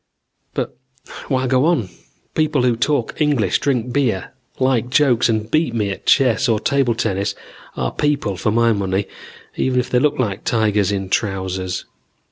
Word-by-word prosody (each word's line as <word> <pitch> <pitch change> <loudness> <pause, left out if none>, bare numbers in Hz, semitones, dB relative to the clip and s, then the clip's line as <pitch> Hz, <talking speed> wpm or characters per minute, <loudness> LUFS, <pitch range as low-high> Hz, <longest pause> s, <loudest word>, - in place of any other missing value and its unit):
"But - - -3 0.5
why 130 -2 0
go 130 +2 +2
on? 150 - +1 0.4
People 155 -4 +1
who 125 -2 +3
talk 125 +2 -1
English, 130 -11 +2
drink 125 -3 -1
beer, 120 -9 0 0.3
like 130 -2 +1
jokes 125 -4 +3
and 110 0 -1
beat 155 -6 +1
me 105 -3 0
at - - -8
chess 130 -1 +3
or 110 -2 +2
table 135 -3 +1
tennis 100 -4 -1 0.4
are - - -1
people 140 -9 0
for 100 - -1
my 115 +1 +3
money, 100 -1 -1 0.5
even 130 -1 +1
if 125 0 -3
they 125 - +4
look 150 +2 +1
like 105 -7 -2
tigers 105 -3 +1
in 95 -2 -3
trousers. 95 -3 -2
120 Hz, 160 wpm, -19 LUFS, 105-130 Hz, 0.5 s, they